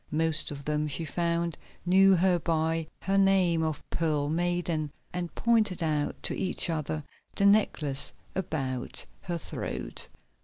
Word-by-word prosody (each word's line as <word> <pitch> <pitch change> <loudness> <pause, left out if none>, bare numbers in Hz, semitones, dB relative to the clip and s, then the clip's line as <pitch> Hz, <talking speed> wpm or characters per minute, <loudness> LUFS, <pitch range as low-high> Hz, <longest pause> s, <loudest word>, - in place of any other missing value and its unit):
Most 160 0 +2
of 140 -1 -7
them, 150 0 0
she 150 +3 -2
found, 170 0 -1 0.3
knew 190 +2 +6
her 180 0 +3
by 160 0 0 0.2
her 195 +1 +2
name 190 -4 +4
of 155 -2 -2
Pearl 150 -3 0
Maiden, 170 -2 0 0.2
and 175 -2 -4
pointed 215 -7 +2
out 150 -2 -1
to - - -1
each 185 -1 0
other 155 -1 -2 0.3
the 200 - +2
necklace 165 -9 +3 0.2
about 135 -9 -2 0.2
her 175 -1 -3
throat. 60 - -5
165 Hz, 140 wpm, -29 LUFS, 150-180 Hz, 0.3 s, knew